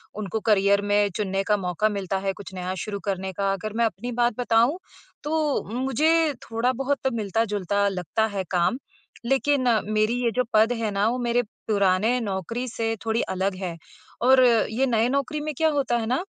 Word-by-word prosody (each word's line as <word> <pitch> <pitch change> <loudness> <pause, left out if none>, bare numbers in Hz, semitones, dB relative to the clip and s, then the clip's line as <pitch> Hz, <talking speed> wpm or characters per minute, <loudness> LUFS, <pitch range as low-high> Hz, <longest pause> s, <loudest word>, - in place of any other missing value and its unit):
उनको 215 +1 -3
करियर 200 -1 +3
में 205 0 +2
चुनने 195 -2 -1
का 210 0 +2
मौका 185 +3 0
मिलता 195 -2 -2
है, 195 0 -2
कुछ 195 -1 -11
नया 185 0 -4
शुरू 200 -1 -4
करने 190 -1 -2
का। 195 +1 0
अगर 215 +2 -5
मैं 235 - +3
अपनी 225 +4 -3
बात 240 0 +1
बताऊँ, 240 +6 +3 0.5
तो 305 -1 0
मुझे 300 +5 +2 0.2
थोड़ा-बहुत 255 +4 0
मिलता-जुलता 205 -2 0
लगता 190 +3 -1
है 190 - 0
काम, 180 +7 +2 0.5
लेकिन 270 +1 +2 0.3
मेरी 215 +2 +2
ये 235 - +2
जो 250 +2 +1
पद 220 +2 +4
है 220 -2 -1
ना, 200 +2 +1
वो 250 - -1
मेरे 240 0 +1 0.3
पुराने 205 +3 +2
नौकरी 215 +5 -3
से 225 -1 -2
थोड़ी 225 +1 +1
अलग 190 +1 -1
है 185 -3 -5 0.5
और 260 +1 +6 0.3
ये 245 +5 +1
नए 230 -2 +2
नौकरी 280 +3 -1
में 305 0 -3
क्या 320 - +3
होता 275 -5 0
है 225 - -2
ना, 255 +9 0
220 Hz, 180 wpm, -24 LUFS, 200-250 Hz, 0.5 s, और